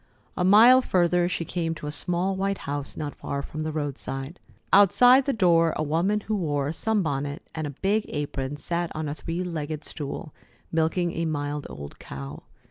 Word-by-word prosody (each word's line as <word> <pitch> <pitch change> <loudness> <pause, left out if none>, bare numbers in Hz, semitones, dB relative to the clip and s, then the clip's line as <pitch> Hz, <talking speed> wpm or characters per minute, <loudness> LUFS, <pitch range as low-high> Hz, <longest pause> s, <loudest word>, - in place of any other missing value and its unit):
A 180 - 0
mile 225 +7 +8
further 175 -4 +2
she 170 -2 -2
came 165 -1 -2
to 155 - -8
a 150 - -3
small 180 +5 0
white 195 +1 -1
house 145 0 -4
not 145 -1 -4
far 140 0 -4
from 155 - -6
the 155 0 -2
roadside. 145 0 -4 0.3
Outside 245 +7 +7
the 280 - +1
door 170 - +3
a - - 0
woman 175 +8 +1
who 215 +1 -2
wore 145 -7 -1
a - - -3
sunbonnet 145 -9 -1
and 155 -2 -3
a 145 - -9
big 210 +2 +1
apron 145 -1 -3
sat 170 +2 -2
on 155 0 -3
a 145 - -2
three 165 +3 -4
legged 155 -3 -4
stool, 150 0 -4 0.4
milking 165 +2 +1
a 165 0 -2
mild 145 -2 -3
old 70 0 -9
cow. 70 +2 -8
160 Hz, 185 wpm, -26 LUFS, 145-185 Hz, 0.4 s, mile